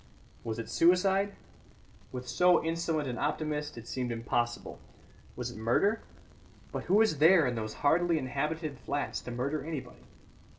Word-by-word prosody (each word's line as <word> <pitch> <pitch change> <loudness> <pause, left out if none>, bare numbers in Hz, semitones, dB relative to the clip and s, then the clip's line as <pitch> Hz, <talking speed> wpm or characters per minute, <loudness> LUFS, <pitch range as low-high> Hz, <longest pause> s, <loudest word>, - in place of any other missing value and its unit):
Was 115 -1 -3
it 115 -1 -5
suicide? 190 - +3 0.8
With 125 -1 -6
so 180 +5 +4
insolent 165 -2 -1
an 125 -1 -4
optimist 150 -1 -2
it 115 0 -9
seemed 125 -1 -2
impossible. 120 +1 -2 0.6
Was - - -4
it - - -11
murder? 200 - +2 0.7
But - - -4
who 185 - +2
was 215 -9 +4
there 165 0 +7
in 125 - 0
those 110 -2 -4
hardly 170 +3 +4
inhabited 150 +2 -3
flats 145 0 -3
to - - -8
murder 135 +5 -2
anybody? 155 -3 -7
150 Hz, 145 wpm, -30 LUFS, 125-170 Hz, 0.8 s, there